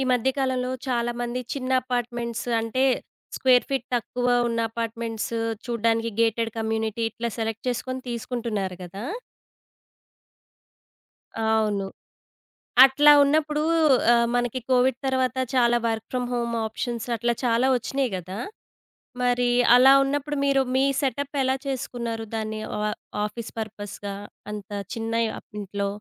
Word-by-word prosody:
ఈ - - +1
మధ్య 250 +1 +2
కాలంలో 255 -1 0 0.2
చాలా 240 -1 0
మంది 240 +1 -2
చిన్న 260 -2 -4
అపార్ట్‌మెంట్స్ 240 -1 -3
అంటే 230 +4 0 0.5
స్క్వేర్ 255 -1 +4
ఫీట్ 270 -3 -2
తక్కువ 245 +1 -2 0.2
ఉన్న 230 0 -1
అపార్ట్‌మెంట్స్ 230 0 -4 0.3
చూడడానికి 230 -1 +1
గేటెడ్ 225 0 +1
కమ్యూనిటీ 220 0 -1
ఇట్లా 230 +1 -4
సెలెక్ట్ 225 +1 -3
చేసుకొని 255 +1 -3
తీసుకుంటున్నారు 225 -6 -3
కదా! 190 +4 -8 2.4
అవును. 220 -2 +1 1.0
అట్లా 290 +2 +6
ఉన్నప్పుడు, 300 +1 +1 0.5
ఆహ్, 235 0 +3
మనకి 245 +1 0
కోవిడ్ 255 0 +3
తరువాత 260 -1 0 0.2
చాలా 240 -1 +4
వర్క్ 225 -1 -2
ఫ్రం 250 -1 -1
హోమ్ 235 -1 -1
ఆప్షన్స్ 230 +1 -4
అట్లా 235 +1 0
చాలా 235 +2 +3
ఒచ్చినియి 255 +1 -2
గదా! 185 +2 -6 0.8
మరి 245 0 +2 0.3
అలా 260 +2 +8
ఉన్నప్పుడు 290 +2 -2
మీరు 275 -1 +3
మీ 265 +1 +4 0.2
సెటప్ 280 +1 -2
ఎలా 260 0 +2
చేసుకున్నారు? 235 -4 -3
దాన్ని 220 0 -3 0.2
ఆ - - -2 0.4
ఆఫీస్ 220 +2 -6
పర్పస్‌గా 205 -2 -6 0.4
అంత 210 -1 -7 0.2
చిన్న 225 0 -3 0.3
అప్ - - -27
ఇంట్లో. 200 0 -3
235 Hz, 120 wpm, -25 LUFS, 225-255 Hz, 2.4 s, అలా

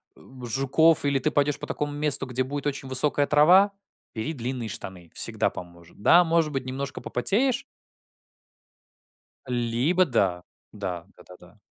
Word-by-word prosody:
э, - - -19 0.2
жуков 140 +6 +2
или 140 -1 +2
ты - - 0
пойдёшь 145 0 +1
по - - -7
такому 145 0 -3
месту, 145 -1 0
где 125 0 -2
будет 145 +2 -4
очень 140 -1 -4
высокая 145 +2 +1
трава? 180 +7 +5 0.4
Бери 115 +8 -3
длинные 125 -3 -4
штаны. 90 -3 -7
Всегда - - 0
поможет. 85 +1 -12
Да, 175 +10 +6
может 165 -2 +1
быть, 135 -2 -3
немножко 135 +1 -5
попотеешь. 240 - 0 1.8
Либо 125 +9 +1
да. 95 - 0 0.3
Да, 90 -5 -5
да-да-да. 90 +2 -17
135 Hz, 140 wpm, -25 LUFS, 115-150 Hz, 1.8 s, Да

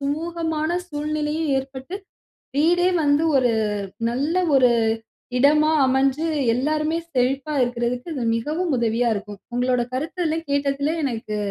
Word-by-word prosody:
சுமூகமான 320 +3 -2
சூழ்நிலையும் 300 0 -2
ஏற்பட்டு, 265 +7 -6 0.6
வீடே 350 +4 +3
வந்து 290 +2 +3
ஒரு 250 -2 +3 0.6
நல்ல 285 +8 -1 0.2
ஒரு 250 -2 +5 0.7
இடமா 300 +3 +4 0.2
அமஞ்சு, 270 +4 +2 0.3
எல்லாருமே 305 +4 0 0.2
செழிப்பா 270 +4 0
இருக்குறதுக்கு 245 +5 -2
இது 255 - -2
மிகவும் 310 +6 -2
உதவியா 235 +1 +1
இருக்கும். 205 0 -7 0.2
உங்களோட 250 0 +1
கருத்து 315 +7 -3
எல்லாம் 325 0 -3
கேட்டத்துல 280 +2 0
எனக்கு 225 -5 -3
285 Hz, 115 wpm, -22 LUFS, 250-315 Hz, 0.7 s, ஒரு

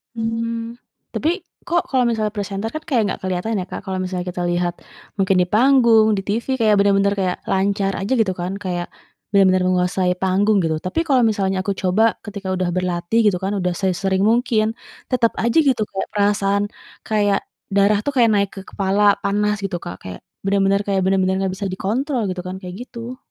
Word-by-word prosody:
Hmm, 230 +1 -3 0.3
tapi 345 +5 -1 0.2
kok 345 0 0
kalau 255 -2 +2
misalnya 220 -3 0
presenter 200 +1 -3
kan 310 - -4
kayak 250 -7 +2
enggak - - -4
kelihatan 185 +4 -1
ya, 185 - -2
Kak, - - -5
kalau 190 -1 -3
misalnya 180 -1 -3
kita 175 0 -3
lihat 175 0 0 0.4
mungkin 190 -1 +3
di 180 - +1
panggung, 230 -2 +5
di 195 - -1
TV, 225 +7 -2
kayak 215 -2 +4
bener-bener 200 0 +3
kayak 185 -2 0
lancar 195 +1 +1
aja 195 +6 -1
gitu 210 - +1
kan, 180 +2 -3
kayak 175 -3 -3 0.5
bener-bener 185 -2 +4
menguasai 180 0 +1
panggung 195 +2 +2
gitu, 160 -2 0
tapi 185 - -2
kalau 270 -7 +3
misalnya 195 -3 0
aku 200 - 0
coba 185 +4 +2 0.2
ketika 200 -2 -5
udah 185 -1 -1
berlatih 180 +3 0
gitu 200 -4 +3
kan, 195 +2 -1
udah 180 -2 0
sesering 190 +1 0
mungkin 225 -2 +1 0.3
tetap 235 -3 +2
aja 235 +4 +1
gitu 250 -5 +2
kayak 195 - -3
perasaan 200 -1 +2 0.4
kayak 205 -2 +2 0.3
darah 200 +1 +4
tuh 285 - -1
kayak 240 -4 +4
naik 200 -1 +2
ke 195 - -7
kepala, 200 +1 +2
panas 210 +1 +1
gitu, 175 -3 -4
Kak, 90 - -6
kayak 90 -1 -7 0.3
bener-bener 195 0 +2
kayak 195 -2 +1
bener-bener 190 0 +2
nggak 190 -1 -1
bisa 200 - -4
dikontrol 250 +8 -1
gitu 185 -1 -4
kan, 185 - -5
kayak 180 -1 -7
gitu. 240 +1 -8
200 Hz, 185 wpm, -20 LUFS, 185-225 Hz, 0.5 s, panggung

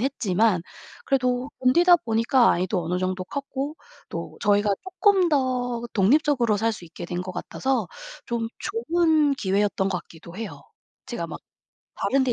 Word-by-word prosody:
했지만 220 -7 +1 0.4
그래도 255 0 0
견디다 345 +8 +6
보니까 230 +1 +3
아이도 180 +1 -1
어느 180 +3 -1
정도 185 0 -2
컸고 280 - -4 0.3
또 - - -6
저희가 205 0 +3
쪼끔 375 -1 +3
더 250 -4 0
독립적으로 240 +1 +3
살 225 +2 +1
수 195 -5 -9
있게 165 - -9
된 175 +1 -3
것 185 0 -6
같아서 265 +8 -2 0.4
좀 235 -2 -2
좋은 330 -8 +2
기회였던 195 -3 0
것 180 - -1
같기도 170 +2 -13
해요. 180 -11 -7 0.4
제가 235 -10 -4
막 - - -7 0.6
다른 270 -1 +1
데 250 - +1
235 Hz, 295 characters per minute, -24 LUFS, 190-275 Hz, 0.6 s, 견디다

